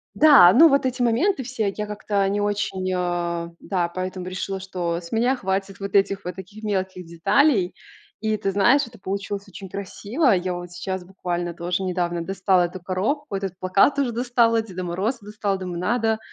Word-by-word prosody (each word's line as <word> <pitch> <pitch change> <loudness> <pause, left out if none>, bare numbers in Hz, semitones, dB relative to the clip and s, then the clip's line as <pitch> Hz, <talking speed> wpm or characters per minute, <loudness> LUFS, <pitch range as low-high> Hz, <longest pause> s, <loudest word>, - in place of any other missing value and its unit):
Да, 280 - +8
ну, 325 +6 +8
вот 275 -1 +2
эти 255 -1 -1
моменты 265 - +2
все 225 -5 -2
я 210 0 -3
как-то 205 -1 -1
не 205 +1 0
очень, 200 -2 -1
а, 175 -1 -2
да, 175 -3 -1
поэтому 185 +1 -5
решила, 190 +1 -4
что 180 -3 -3
с 170 - -12
меня 240 +4 +2
хватит 195 -3 -3
вот 200 0 -5
этих 195 0 +2
вот 180 0 -5
таких 190 +3 -11
мелких 190 -3 -2
деталей. 185 - +2 0.5
И 215 0 0
ты 195 -1 -1
знаешь, 240 +9 +4
это 230 -2 -15
получилось 200 +1 -4
очень 195 0 -10
красиво. 215 - -1
Я 185 -1 +1
вот 175 0 -7
сейчас 185 +1 -4
буквально 175 -2 -4
тоже 175 +2 -2
недавно 175 -2 -1
достала 190 0 +2
эту 180 +2 -7
коробку, 200 - -2
этот 195 -2 -4
плакат 195 +10 +3
уже 265 -4 +1
достала, 235 -1 +2
Деда 185 -4 -7
Мороза 190 +9 -1
достала. 205 -1 -2
Думаю, 180 -2 -5
надо, 220 +3 +1
195 Hz, 180 wpm, -23 LUFS, 180-220 Hz, 0.5 s, Да